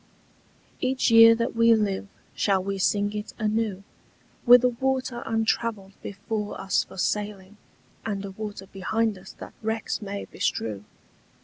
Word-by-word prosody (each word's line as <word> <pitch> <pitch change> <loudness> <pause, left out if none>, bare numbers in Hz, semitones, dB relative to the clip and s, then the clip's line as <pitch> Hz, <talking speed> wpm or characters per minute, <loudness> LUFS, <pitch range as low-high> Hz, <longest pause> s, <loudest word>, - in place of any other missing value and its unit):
Each 255 -1 +1
year 230 0 +9
that 230 0 -2
we 230 0 +5
live 205 -2 -1 0.3
shall 195 -2 +1
we 195 0 -3
sing 205 +2 +1
it 210 0 -6
anew, 215 -3 -1 0.6
With 245 0 +9
a 250 - +5
water 255 0 -2
untravelled 225 -3 -1
before 210 +1 -5
us 195 +1 +1
for - - -14
sailing 205 0 -2 0.5
And 200 -2 -3
a 195 - -6
water 205 -1 -7
behind 210 +3 -1
us 190 - -12
that - - -11
wrecks 220 +1 -2
may 200 -1 -5
bestrew. 105 -2 -3
210 Hz, 140 wpm, -25 LUFS, 195-230 Hz, 0.6 s, year